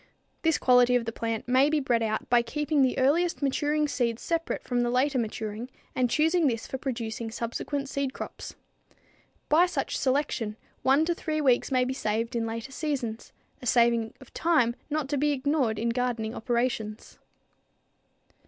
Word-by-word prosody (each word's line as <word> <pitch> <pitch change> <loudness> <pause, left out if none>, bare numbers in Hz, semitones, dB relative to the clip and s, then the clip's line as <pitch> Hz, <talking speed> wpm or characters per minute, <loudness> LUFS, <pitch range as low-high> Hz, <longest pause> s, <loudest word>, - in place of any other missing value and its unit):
This 325 -1 +2
quality 250 -1 +5
of 240 -2 +1
the 230 - -2
plant 225 0 -3
may 260 +3 +4
be 310 0 +2
bred 240 -4 +1
out 220 -1 -1
by 240 -1 +4
keeping 295 +5 0
the 260 -2 +2
earliest 305 +5 +2
maturing 295 +2 +1
seed 240 -5 0
separate 330 +5 -2
from 245 -1 0
the 240 - +1
later 260 +2 +2
maturing 220 +1 -4 0.2
and 250 -1 +1
choosing 320 +4 +3
this 230 -3 -1
for 265 - -5
producing 230 -3 -4
subsequent 240 +5 -3
seed 275 -1 -2
crops. - - -8 0.9
By 335 +4 +5
such 330 -6 -2
selection 260 -5 0 0.2
one 275 +4 +4
to 345 - +1
three 310 -2 -3
weeks 265 -2 +2
may 255 -1 +3
be 260 - -2
saved 230 0 -2
in 230 -1 0
later 230 +3 -5
seasons, 265 -7 -3 0.3
a 250 - -5
saving 235 -2 +3
of 265 - -16
time 285 -9 +2
not 305 -2 -1
to 285 -2 0
be 295 +1 +2
ignored 270 -5 0
in 235 +2 0
gardening 230 -2 -1
operations. 235 -3 -2
255 Hz, 170 wpm, -27 LUFS, 230-290 Hz, 0.9 s, quality